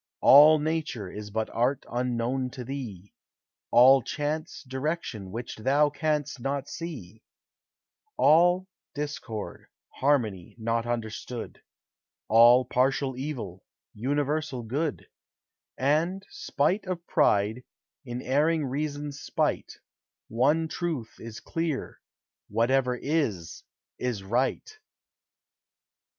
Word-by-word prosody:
All 150 +3 +9
nature 150 - -3
is 105 0 -7
but 110 +1 -2
art 125 +3 0
unknown 125 +1 -1
to 125 -2 -6
thee; 115 -8 -7 0.6
All 130 +3 +7
chance, 155 +4 -4
direction 130 - -4
which 115 +5 -6
thou 140 +6 +3
canst 150 -3 -1
not 135 +2 -2
see; 130 - -7 1.0
All 175 +4 +4 0.3
discord, 145 -7 -5 0.2
harmony 115 -11 0
not 115 +1 -1
understood; 115 0 -5 0.7
All 120 +3 +7
partial 130 +1 +1
evil, 125 - -5 0.3
universal 145 +2 -1
good: 140 +6 -3 0.7
And, 165 +8 +1
spite 180 +8 -1
of 175 -2 -4
pride, 110 -6 +2 0.4
in 125 -1 -6
erring 150 +4 +2
reason's 145 +1 -4
spite, - - -1 0.6
One 145 +8 +2
truth 155 -9 -4
is 115 -1 -8
clear 165 -4 -3 0.5
Whatever 125 +4 +1
is, 120 - -2 0.4
is 120 -6 -2
right. 120 - 0
130 Hz, 95 wpm, -27 LUFS, 115-150 Hz, 1.0 s, All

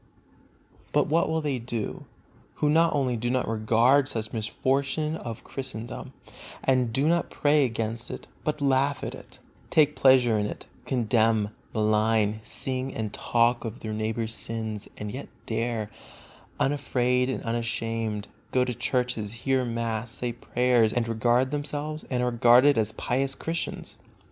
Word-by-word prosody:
But - - +4
what 165 +2 +2
will 160 0 0
they 140 -4 -1
do, 115 -2 -4 0.5
who 150 - +1
not 165 0 +4
only 130 -4 +1
do 120 +1 -2
not 130 0 0
regard 115 +5 +3
such 110 -3 -4
misfortune 135 +7 0
of 115 -8 -7
Christendom, 130 -4 -6 0.5
and 130 -3 +2
do 135 +6 +1
not 170 0 +2
pray 145 -1 +3
against 115 0 -2
it, - - -7 0.2
but 150 -1 -2
laugh 140 0 +2
at - - -3
it, - - -12 0.3
take 150 -1 +4
pleasure 125 -5 +5
in 105 - 0
it, - - -7 0.2
condemn, 110 -3 +2 0.2
malign, 110 0 +2
sing 130 +4 -1
and 110 -2 -3
talk 120 +1 +2
of 115 0 -6
their 110 -1 -4
neighbor's 110 +1 -2
sins, 110 -2 -4
and 105 -1 -5
yet 130 +5 -7 0.2
dare, 115 -1 -2 0.7
unafraid 125 -2 +1
and 130 - -3
unashamed, 115 -2 -2 0.2
go 125 -1 +3
to 125 - -2
church, 125 +1 0
hear 120 +5 -1
mass, 115 -1 -2
say 125 -2 -1
prayers, 120 -1 +2
and 120 -1 0
regard 120 +3 +2
themselves 150 +1 -3
and 125 -2 0
are 125 - +1
regarded 120 +4 +6
as 110 -1 +1
pious 135 +2 -1
Christians? 165 +1 -4
120 Hz, 150 wpm, -27 LUFS, 110-135 Hz, 0.7 s, regarded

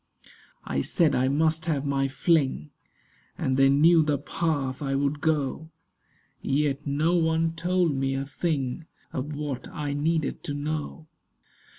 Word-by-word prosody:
I 70 - -1
said 155 - +2
I 130 +1 +2
must 160 +3 +1
have 145 -3 0
my 135 -1 +1
fling, 135 - +1 0.7
And 130 - 0
they 135 0 +5
knew 160 +4 +5
the 150 -2 +1
path 140 -2 -2
I 135 -1 -1
would 140 +1 -1
go; 155 0 -1 0.7
Yet 145 +1 0
no 150 +5 +1
one 165 -1 +2
told 175 -1 +1
me 135 0 0
a 135 +1 -2
thing 145 0 -2 0.3
Of 145 +3 -4
what 145 -4 -4
I 145 -1 -4
needed 155 +1 -1
to 145 - -3
know. 155 +2 -4
145 Hz, 145 wpm, -26 LUFS, 135-160 Hz, 0.7 s, they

